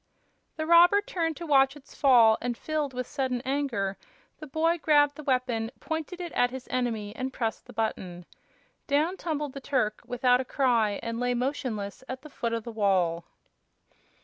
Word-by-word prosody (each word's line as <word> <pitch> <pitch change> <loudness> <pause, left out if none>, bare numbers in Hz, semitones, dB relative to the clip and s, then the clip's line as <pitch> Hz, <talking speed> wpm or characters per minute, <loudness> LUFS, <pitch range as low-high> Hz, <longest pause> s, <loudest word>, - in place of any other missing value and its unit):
The 315 - -3
robber 345 +4 +7
turned 335 -6 -2
to 340 - -6
watch 270 -2 +4
its 290 -2 -15
fall 235 -6 +5
and, 240 -1 -2
filled 305 -1 -2
with 255 0 -4
sudden 260 -3 -2
anger, 255 -9 -1 0.4
the 305 - -8
boy 325 +4 +1
grabbed 290 -2 +4
the 305 - -8
weapon, 250 -5 0
pointed 320 +2 -4
it 350 -2 -5
at 245 - +2
his 260 0 -8
enemy, 225 -4 -2
and 260 +1 -3
pressed 225 -3 -3
the - - -10
button. 185 -6 -3 0.6
Down 305 +6 +1
tumbled 300 -6 -3
the 275 - -7
Turk, 245 -7 -1
without 250 0 +3
a - - -3
cry, 235 -6 +1
and 230 0 -3
lay 245 0 0
motionless 245 -5 -3
at 260 +1 -6
the 305 - -12
foot 235 -3 -3
of 230 -1 -2
the 235 - -7
wall. 185 -6 +1
255 Hz, 175 wpm, -27 LUFS, 230-295 Hz, 0.6 s, robber